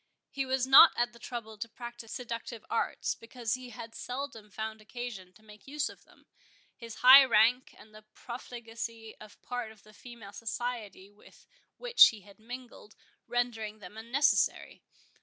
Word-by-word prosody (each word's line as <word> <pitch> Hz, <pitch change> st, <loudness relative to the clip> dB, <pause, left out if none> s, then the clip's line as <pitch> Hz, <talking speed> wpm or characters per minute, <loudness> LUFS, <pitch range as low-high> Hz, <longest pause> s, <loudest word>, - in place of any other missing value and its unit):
He 270 Hz, -1 st, -3 dB
was 260 Hz, -1 st, +1 dB
not 270 Hz, +5 st, +9 dB
at 240 Hz, 0 st, 0 dB
the 235 Hz, -, -16 dB
trouble 220 Hz, -3 st, -7 dB
to 230 Hz, -, -5 dB
practise 240 Hz, -1 st, -10 dB
seductive 235 Hz, -2 st, -6 dB
arts, -, -, -1 dB
because 230 Hz, -1 st, -5 dB
he 255 Hz, 0 st, -5 dB
had 230 Hz, 0 st, -10 dB
seldom 250 Hz, -4 st, -6 dB
found 220 Hz, +1 st, -6 dB
occasion 215 Hz, -5 st, -8 dB
to 215 Hz, +3 st, -22 dB
make 210 Hz, +1 st, -17 dB
use 295 Hz, +1 st, -2 dB
of -, -, -15 dB
them; -, -, -24 dB, 0.5 s
his 230 Hz, -1 st, -10 dB
high 265 Hz, +2 st, +11 dB
rank, 245 Hz, +1 st, +3 dB
and 215 Hz, -, -17 dB
the 215 Hz, -, -13 dB
profligacy 230 Hz, -2 st, -8 dB
of 215 Hz, -1 st, -14 dB
part 245 Hz, -3 st, -5 dB
of 220 Hz, -2 st, -19 dB
the 215 Hz, -, -18 dB
female 225 Hz, -3 st, -12 dB
society 225 Hz, -4 st, -5 dB
with 205 Hz, -, -20 dB, 0.3 s
which -, -, +7 dB
he 220 Hz, -4 st, -5 dB
had 200 Hz, +2 st, -18 dB
mingled, 240 Hz, -2 st, -11 dB, 0.3 s
rendering 230 Hz, -3 st, -2 dB
them 205 Hz, -1 st, -12 dB
unnecessary. 235 Hz, +6 st, +1 dB
230 Hz, 160 wpm, -30 LUFS, 215-245 Hz, 0.5 s, high